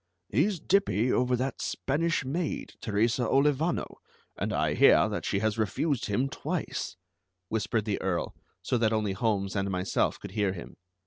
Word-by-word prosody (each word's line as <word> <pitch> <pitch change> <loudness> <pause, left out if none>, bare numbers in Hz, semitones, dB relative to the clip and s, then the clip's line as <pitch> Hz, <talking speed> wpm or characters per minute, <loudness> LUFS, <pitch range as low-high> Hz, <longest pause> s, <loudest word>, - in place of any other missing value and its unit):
"He's 170 - +1
dippy 125 - +2
over 125 0 +2
that 130 +2 -2
Spanish 155 +2 0
maid, 155 +5 -3
Teresa 115 +3 +1
Olivano, 145 +4 +1 0.4
and - - -2
I - - +1
hear - - +6
that - - -3
she - - 0
has 110 0 0
refused 115 - 0
him 125 +6 +1
twice," - - -3 0.5
whispered 110 0 0
the 105 -3 -1
Earl 95 -2 -1 0.3
so 125 - 0
that 115 -1 +2
only 105 -3 0
Holmes 100 -2 0
and 100 0 0
myself 90 0 0
could - - -8
hear 100 -2 0
him. 85 - -9
115 Hz, 155 wpm, -29 LUFS, 100-135 Hz, 0.5 s, hear